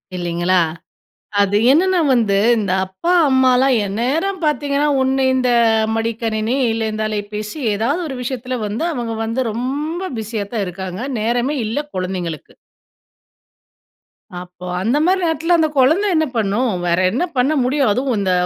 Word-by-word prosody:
இல்லிங்களா! 175 +1 0 0.8
அது 200 0 +2 0.2
என்னென்னா? 365 +4 +3
வந்து 220 -5 +2 0.2
இந்த 205 -4 -2
அப்பா, 190 - -2 0.2
அம்மாலாம், 260 0 +4
எந்நேரம் 290 - -1
பாத்தீங்கன்னா 295 -1 +1
ஒண்ணு 265 0 +1
இந்த 255 -1 +1 0.5
மடிக்கணினி, 225 +1 -1 0.2
இல்ல 225 0 -1
இந்த 215 - -3
அலைபேசி, 210 +3 -5 0.2
ஏதாவது 235 - 0
ஒரு 265 - -5
விஷயத்தில 250 0 -4
வந்து, 215 +10 -3
அவங்க 235 -3 -3
வந்து 230 +4 -1
"ரொம்ப" 290 - -3 0.2
பிஸியாதான் 215 -1 -3
இருக்காங்க. 185 +1 -6 0.2
நேரமே 240 +6 0
இல்ல 225 +7 -2 0.2
குழந்தைங்களுக்கு. 180 -4 -4 1.9
அப்போ, 180 0 -11
அந்த 230 +9 +1
மாரி 370 +3 +2
நேரத்தில, 330 +1 +1
அந்த 320 -1 +3
குழந்த 300 +10 +3
என்ன 315 - +2
பண்ணும்? 220 +4 +1 0.2
வேற 170 0 +1
என்ன 250 - 0
பண்ண 265 +5 +2
முடியும்? 265 0 +1
அதுவும், 255 +2 0
இந்த 190 -2 0
240 Hz, 135 wpm, -18 LUFS, 205-280 Hz, 1.9 s, அம்மாலாம்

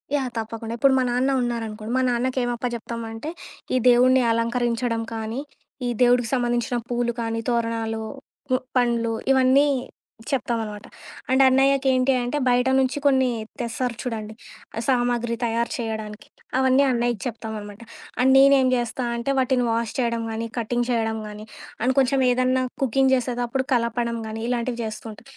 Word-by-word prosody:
Yeah! 265 -3 -1
తప్పకుండా. 225 +1 -4
ఇప్పుడు 270 +2 +4
మా - - +2
నాన్న 255 +3 +1
ఉన్నారనుకోండి. 225 -2 -3
మా - - +2
నాన్నకేమప్పచెప్తామంటే, 240 0 -3 0.5
ఈ - - +4
దేవుణ్ని 255 +1 +5
అలంకరించడం 235 0 0
కానీ, 225 +3 -4 0.5
ఈ - - 0
దేవుడికి 245 -1 +4
సంబంధించిన 240 -1 0
పూలు 240 -1 0
కానీ, 225 0 -2
తోరణాలు, 230 -1 -1 0.5
పు 255 - +3 0.2
పండ్లు 235 -2 +1 0.2
ఇవన్నీ 265 +2 +5 0.6
చెప్తాం 240 -3 0
అనమాట. 210 -1 -8 0.4
అండ్ 260 +1 +4
అన్నయ్యకి 270 +1 +3
ఏంటి 255 +1 +3
అంటే 245 +5 -2
బయట 250 +1 +3
నుంచి 260 +2 +1
కొన్ని 260 -2 +4 0.3
తెస్తారు 240 0 -2
చూడండి. 220 -3 -4 0.5
సామాగ్రి 240 -2 +1
తయారు 235 0 0
చేయడానికి. 220 -2 -5 0.3
అవన్నీ 265 +1 +4
అన్నయ్యకి 240 -4 0
చెప్తాం 225 -2 -5
అనమాట. 205 +2 -10 0.4
అండ్ 265 +1 +5
నేనేం 270 -1 +6
చేస్తా 240 +1 -1
అంటే 235 +4 -1
వాటిని 255 -1 +2
వాష్ 230 0 -1
చేయడం 235 -2 0
గానీ, 225 +1 -3
కటింగ్ 240 +1 0
చేయడం 225 -2 0
గానీ 210 0 -9 0.4
అండ్ 260 +1 +2
కొంచెం 270 +1 +2
ఏదన్నా 255 +1 +2 0.2
కుకింగ్ 265 +1 +2
చేసేదప్పుడు 245 +1 -1
కలపడం 235 0 0
గానీ 220 0 -5
ఇలాంటివి 245 0 -1
చేస్తూ 215 +1 -6
ఉంటా. 210 - -14
240 Hz, 140 wpm, -23 LUFS, 230-255 Hz, 0.6 s, నేనేం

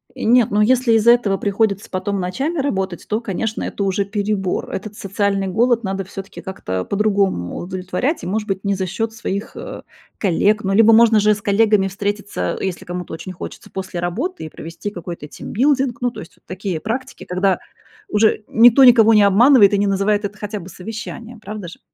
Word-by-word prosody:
Нет, 240 0 +3
ну, 205 - +1
если 250 +2 +3
из-за 225 +1 +5
этого 215 -5 +2
приходится 200 0 -1
потом 200 +1 -2
ночами 270 - -2
работать, 190 -10 -2
то, 215 +2 -1
конечно, 220 +1 -3
это 200 - -3
уже 195 +1 0
перебор. 200 -2 -2
Этот 210 +2 -6
социальный 195 0 -1
голод 235 +4 +2
надо 195 0 -2
всё-таки 195 +1 -9
как-то 95 - -4
по-другому 200 - 0
удовлетворять, 185 - -3
и, - - -4
может 210 +2 -1
быть, 195 0 -3
не 200 - +1
за 190 0 -2
счёт 225 +5 -3
своих, 210 -2 -5
э, - - -8 0.3
коллег. 205 +3 +1
Ну, 195 - 0
либо 225 +2 +6
можно 225 -1 +6
же 210 - +3
и - - +5
с 205 - -6
коллегами 205 -1 +3
встретиться, 200 - -3
э, - - -3
если 185 -2 -4
кому-то 180 -1 -6
очень 165 +3 -7
хочется, 180 - -9
после 190 -2 -5
работы 235 - -3
и - - -7
провести 165 +6 -7
какой-то 170 -5 -7
тимбилдинг. 265 - 0
Ну, 245 - 0
то - - -10
есть 165 - -11
вот - - -33
такие 185 -3 -4
практики, 260 +5 -5
когда 185 +1 0 0.5
уже 215 - +2
никто 240 +4 +6
никого 230 -3 +7
не 210 -1 +6
обманывает. 210 +2 +6
И 200 - +3
не 205 - +1
называет 200 +1 +1
это 205 +1 -6
хотя 210 0 -5
бы 170 - -10
совещанием, 225 +4 -8
правда 210 -3 -7
же? - - -13
205 Hz, 195 wpm, -19 LUFS, 190-225 Hz, 0.5 s, никого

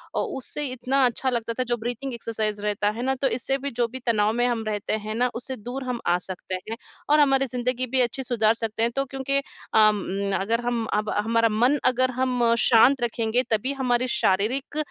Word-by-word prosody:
ओ - - +1
उससे 295 +3 -3
इतना 260 +2 0
अच्छा 250 +2 0
लगता 230 -2 -2
था, 255 - -1
जो 240 -1 -1
ब्रीथिंग 245 +3 -4
एक्सरसाइज़ 215 -3 -3
रहता 205 0 +1
है 220 +3 -5
ना, 265 +1 +1
तो 270 +1 0
इससे 265 +2 -1
भी 280 +1 -5
जो 235 0 0
भी 260 +3 -8
तनाव 215 -2 +2
में 240 +1 +1
हम 235 -2 -1
रहते 210 -1 -2
हैं 215 - -3
ना, 245 +2 +2
उससे 255 +2 -3
दूर 245 +5 -6
हम 250 -2 -3
आ 175 - +4
सकते 185 0 -6
हैं। 225 - -3 0.3
और 300 +1 +5
हमारी 270 -2 +4
ज़िंदगी 250 0 -1
भी 260 +1 +2
अच्छी 250 +2 -1
सुधार 225 -3 +2
सकते 225 -1 -3
हैं, 235 - +1
तो 275 0 0
क्योंकि 270 +1 -1 0.4
अम, 200 -2 +2
अगर 230 +5 0
हम 240 -1 0
अब 210 0 0
हमारा 230 0 +2
मन 245 +7 +3
अगर 255 0 +2
हम 250 -2 +1
शांत 245 +3 +5
रखेंगे 235 +1 0
तभी 230 +5 0
हमारी 255 -2 0
शारीरिक 235 +7 0
240 Hz, 210 wpm, -24 LUFS, 220-255 Hz, 0.4 s, और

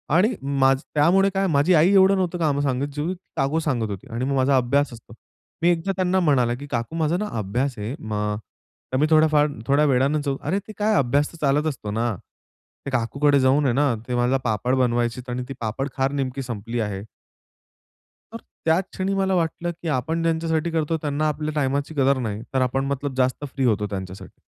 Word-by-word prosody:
आणि 215 +8 +4 0.3
माझं 135 +1 +4
त्यामुळे 185 +6 +4
काय 195 0 +1
माझी 145 +5 +3
आई 165 +4 +5
एवढं 195 0 +6
नव्हतं 180 -1 -1
काम 145 -3 +1
सांगत, 135 0 0
जेवढी 155 +5 -1 0.2
काकू 140 +4 +1
सांगत 125 -9 -1
होती. 100 -2 -7
आणि 120 +2 -2
मग 140 +1 0
माझा 135 0 +3
अभ्यास 130 +2 +1
असतो. 115 0 -13 0.5
मी 170 - +4
एकदा 175 +2 +1
त्यांना 185 0 +1
म्हणाला, 130 -8 +2
की 145 +3 -9
"काकू 120 +4 -3
माझा 165 +1 +1
ना, 210 +1 -2
अभ्यास 120 +6 -2
आहे, 105 +5 -4
मा 105 -1 -2 0.6
तर - - +2
मी 150 - +3
थोड्याफार 155 -1 +4 0.2
थोड्या 145 +2 +4
वेळान" 135 +1 +2 0.3
"अरे! 195 - -1
ते 215 - -8
काय 215 0 +2
अभ्यास 140 +1 +2
तर - - -12
चालत 150 +2 +2
असतो 120 -8 -4
ना. 115 0 -1 0.7
ते 140 - -3
काकूकडे 140 +4 +2
जाऊन 135 +3 +3
आहे 125 - +2
ना, 140 -2 +2
ते 125 - -2
माझा 125 +2 +2
पापड 120 +3 0
बनवायची 120 -1 0
आणि 125 +1 -3
ती - - -4
पापड 115 +6 -2
खार 135 +1 +1
नेमकी 135 -1 -2
संपली 120 -1 -4
आहे" 100 -3 -2 1.3
तर - - -4 0.3
त्याच 165 +4 +3
क्षणी 190 +1 -1
मला 190 -1 +1
वाटलं 170 0 -1
की 170 0 -9
आपण 160 +6 -2
ज्यांच्यासाठी 165 0 0
करतो, 160 0 0
त्यांना 150 +1 0
आपल्या 155 0 -2
टाईमाची 140 +2 -1
कदर 135 0 +3
नाही, 105 +1 -4
तर 130 - +2
आपण 135 +2 0
मतलब 140 0 -3
जास्त 130 +3 0
फ्री 135 - -1
होतो 105 -3 +1
त्यांच्यासाठी. 95 -1 -7
140 Hz, 195 wpm, -23 LUFS, 125-160 Hz, 1.3 s, एवढं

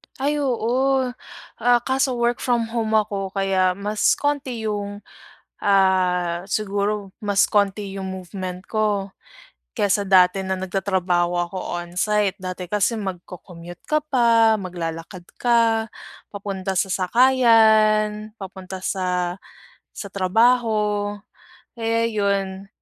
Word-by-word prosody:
Ay 290 +2 -1
oo, 260 0 +1 0.5
ah, 240 +1 +4
kaso 265 -1 0
work 240 0 0
from 235 -2 0
home 220 -2 -1
ako 205 -2 0
kaya 190 -2 +1
mas 205 +2 +1
konti 275 -5 -2
yung, 205 -1 -4 0.6
ah, 180 -3 +2
siguro 205 0 -2
mas 205 -1 +3
konti 200 -1 0
yung 190 -1 -5
movement 185 0 -6
ko, 210 -3 0 0.6
kaysa 200 0 +1
dati 190 0 +4
na 190 - -2
nagtatrabaho 185 -2 0 0.2
ako 190 - -9 0.2
on 175 +1 -11
site. 210 0 +1
Dati 185 -1 -6
kasi 210 +3 +1
mag-co-commute 175 -2 -8
ka 305 -1 +1
pa 230 -5 +4
maglalakad 175 -1 -6 0.2
ka 230 -2 +2 0.4
papunta 195 -2 -4
sa 190 0 +1
sakayan, 215 -1 +3
papunta 190 -1 -8
sa 180 -2 -1 0.6
sa 200 - -6
trabaho 210 0 +2 0.6
kaya 230 -1 0
yun. 200 -3 -1
205 Hz, 110 wpm, -22 LUFS, 190-225 Hz, 0.6 s, ah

